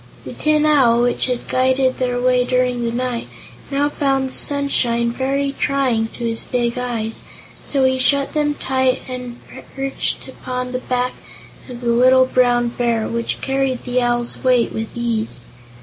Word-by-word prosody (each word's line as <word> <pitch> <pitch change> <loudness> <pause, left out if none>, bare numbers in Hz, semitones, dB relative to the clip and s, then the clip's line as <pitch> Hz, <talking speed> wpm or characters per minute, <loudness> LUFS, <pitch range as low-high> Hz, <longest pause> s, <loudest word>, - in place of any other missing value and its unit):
The - - -7
Tin 305 0 +1
Owl, 250 -6 +4
which 245 +1 0
had 250 -1 -3
guided 260 0 +1
their 245 -1 -1
way 250 0 +2
during 250 -1 0
the 230 - -1
night, 245 0 -3 0.4
now 285 +1 +1
found 270 -2 0
the - - -13
sunshine 240 -5 +3
very 275 +3 -1
trying 260 -6 +1
to 240 - -7
his 230 -1 +3
big 240 -1 -1
eyes, 235 -3 -3 0.4
so 275 -2 +1
he 260 0 +1
shut 275 +1 +2
them 295 -1 0
tight 260 -2 0
and 250 -1 -7 0.4
perched 270 0 -3
upon 250 -1 -5
the 250 - -2
back 250 0 -1 0.6
of 245 -1 -8
the 240 - -1
little 255 +2 +5
Brown 245 -2 +2
Bear, 235 -2 -1
which 230 0 -3
carried 270 -2 -1
the 250 0 0
Owl's 240 0 -1
weight 250 -2 +2
with 225 0 -3
ease. 225 - -2
250 Hz, 165 wpm, -19 LUFS, 240-265 Hz, 0.6 s, little